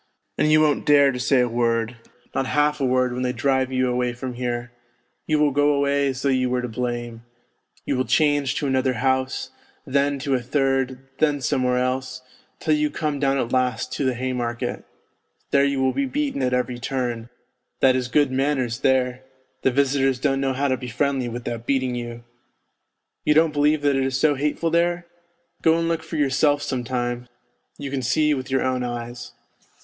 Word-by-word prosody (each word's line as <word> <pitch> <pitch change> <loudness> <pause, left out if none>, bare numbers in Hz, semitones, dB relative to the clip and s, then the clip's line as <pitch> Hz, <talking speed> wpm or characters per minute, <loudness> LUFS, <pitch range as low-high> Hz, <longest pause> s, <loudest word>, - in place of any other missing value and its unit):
And 155 - +3
you 155 0 +6
won't 150 -2 +2
dare 140 -2 +6
to 125 - -5
say 125 +2 +3
a 125 - +2
word, 115 0 0 0.4
not 135 -1 -1
half 150 0 +1
a - - +2
word 125 -1 +1
when 125 - -3
they 125 0 0
drive 130 +1 +1
you 130 0 +1
away 125 0 0
from 125 +1 -6
here; 120 0 -3 0.6
you 155 - +2
will 150 -1 +3
go 145 +1 +3
away 140 0 +1
as 130 -1 -3
though 140 - +2
j'ou 130 -1 +1
were 125 0 0
to - - -2
blame. 120 -1 -4 0.6
You - - 0
will 130 0 0
change 145 -4 +2
to - - -2
another 130 -1 +1
house, 130 +1 -1 0.3
then 140 +1 +1
to 140 0 -2
a 125 - +1
third, 135 0 -1
then 150 -2 +2
somewhere 125 0 +1
else, 130 0 -2 0.4
till 155 - +1
you 150 0 +1
come 150 -1 -2
down 135 -1 +2
at 120 -2 -2
last 125 -2 0
to - - -2
the 130 -2 +1
Haymarket. 120 -1 -3 0.7
There 140 - +4
you 140 -1 0
will 130 - +2
be 280 - 0
beaten 285 - -2
at 125 -1 +1
every 125 -1 -1
turn; 120 -3 -3 0.5
that 130 -1 +5
is 125 -1 -1
good 145 +1 +2
manners 130 -3 0
there, 130 -1 +1 0.4
the - - +3
visitors 135 0 +1
don't 135 0 +1
know 135 -1 0
how 140 +2 0
to 130 -1 +1
be 125 - -7
friendly 135 0 -1
without 120 -1 -5
beating 130 -2 +1
you. 120 -1 -6 1.0
You 150 - +3
don't 160 -1 +4
believe 150 0 +2
that 145 -1 +3
it 135 - +1
is 135 0 -1
so 150 0 +4
hateful 150 +4 -1
there? 175 +1 +1 0.6
Go 160 0 +4
and 165 0 0
look 165 -1 0
for 160 +1 -8
yourself 145 0 +2
some 125 -2 -2
time, 120 0 -3 0.5
you 140 -1 -6
can 135 -1 -2
see 150 +5 +2
with 130 -2 -4
your 135 0 +1
own 130 -1 0
eyes. 120 0 -6
130 Hz, 195 wpm, -23 LUFS, 125-145 Hz, 1.0 s, you